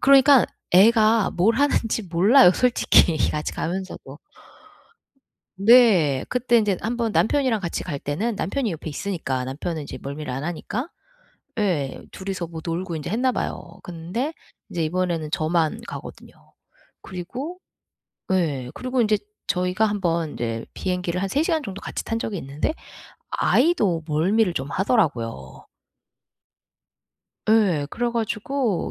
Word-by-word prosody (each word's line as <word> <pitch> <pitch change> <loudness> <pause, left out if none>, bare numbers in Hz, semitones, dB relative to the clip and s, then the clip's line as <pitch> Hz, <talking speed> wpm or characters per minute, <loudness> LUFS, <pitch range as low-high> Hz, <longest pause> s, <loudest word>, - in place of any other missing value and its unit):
그러니까 275 -1 +6 0.3
애가 215 +2 +5
뭘 215 +6 +2
하는지 235 -6 +1
몰라요. 185 +7 +6
솔직히 240 -9 +4
같이 150 0 -3
가면서도. 170 -5 -5 1.4
네. 195 - +5
그때 245 -1 +2
인제 205 -4 +1
한 235 +2 -2
번 230 -2 0
남편이랑 250 0 +2
같이 170 -3 -3
갈 145 -6 -4
때는 205 +11 -2
남편이 230 +1 -1
옆에 160 0 -6
있으니까 145 -6 -3
남편은 155 +4 -4
인제 - - -8
멀미를 140 0 -5
안 135 +3 -4
하니까 210 - -4 0.7
예 160 -10 -1
둘이서 190 -2 -5
뭐 160 -1 -8
놀고 170 +1 -3
인제 150 - -6
했나 250 +5 +1
봐요. 170 -7 -5
근데 180 - -4 0.4
이제 170 -4 -2
이번에는 170 -2 -1
저만 165 +6 0
가거든요. - - -9 0.7
그리고 250 - -7 0.7
예. 145 -9 0
그리고 255 -1 -1
인제 215 -1 +3 0.3
저희가 180 +2 +1
한 205 -1 -1
번 165 -3 0
인제 115 -1 -4
비행기를 180 -1 -2
한 195 - 0
3 290 +8 +1
시간 320 -4 0
정도 195 -2 -7
같이 - - -5
탄 225 0 -2
적이 210 -4 -3
있는데 145 - -3 0.6
아이도 220 - +2
멀미를 180 +6 +2
좀 135 -2 -3
하더라고요. 120 - -1 1.8
예. 195 -10 +3
그래 240 0 -1
가지고 230 -1 -1
185 Hz, 285 characters per minute, -23 LUFS, 160-230 Hz, 1.8 s, 그러니까